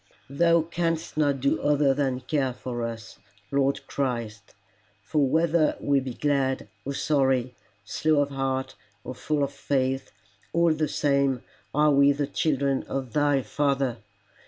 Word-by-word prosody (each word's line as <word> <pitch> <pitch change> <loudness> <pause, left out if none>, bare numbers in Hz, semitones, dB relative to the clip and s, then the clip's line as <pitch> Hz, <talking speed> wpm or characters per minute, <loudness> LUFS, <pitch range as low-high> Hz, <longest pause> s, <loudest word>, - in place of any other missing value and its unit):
Thou 170 +3 +3
canst 165 -1 -2
not 145 -3 +1
do 140 - +1
other 145 -2 +3
than 135 -2 -1
care 135 0 -1
for 120 -1 -5
us, 115 -1 -6 0.3
Lord 140 0 +1
Christ, 115 -7 -4 0.5
for 140 +4 +1
whether 160 +1 +2
we 140 -1 +2
be 130 -2 -6
glad 135 -3 0 0.2
or 140 +1 -4
sorry, 135 -4 +1 0.3
slow 155 +6 +1
of 140 - -5
heart 135 -1 -2 0.3
or - - -6
full 145 +3 -1
of 140 - -1
faith, 135 -1 -1 0.4
all 170 -1 +4
the 155 0 0
same 140 -3 +1 0.3
are 150 +1 +3
we 140 0 +5
the 145 +1 -1
children 140 -2 0
of 130 -3 -4
thy 145 -2 +2
Father. 135 0 0
140 Hz, 145 wpm, -26 LUFS, 130-150 Hz, 0.5 s, we